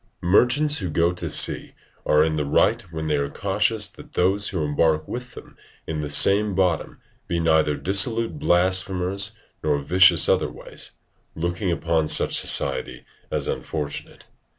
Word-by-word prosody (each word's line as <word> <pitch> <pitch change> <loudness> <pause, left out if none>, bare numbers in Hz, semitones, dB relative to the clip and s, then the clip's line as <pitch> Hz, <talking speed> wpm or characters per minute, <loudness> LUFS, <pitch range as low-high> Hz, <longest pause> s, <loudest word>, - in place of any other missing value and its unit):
Merchants 130 +11 +3
who 90 -3 -4
go 85 +2 0
to 90 - -5
sea - - +2 0.3
are 75 0 +4
in 80 0 -1
the 75 - -2
right 70 - +1
when 80 -1 -6
they 75 -1 0
are 70 0 -2
cautious 105 +3 0
that - - -14
those 95 +3 +1
who 90 -6 -3
embark 75 +1 0
with 125 0 -8
them - - -13 0.3
in 80 -1 -4
the 75 - -5
same 100 +6 +4
bottom 90 -4 -1 0.3
be 85 - -2
neither 80 -2 +1
dissolute 105 - +1
blasphemers 95 -1 0 0.3
nor 75 -2 0
vicious 85 +4 +5
other - - +1
ways, - - -8 0.4
looking 85 +3 -3
upon 80 -2 -1
such - - +3
society - - -1 0.2
as - - -1
unfortunate. 75 -3 -6
90 Hz, 150 wpm, -22 LUFS, 80-100 Hz, 0.4 s, vicious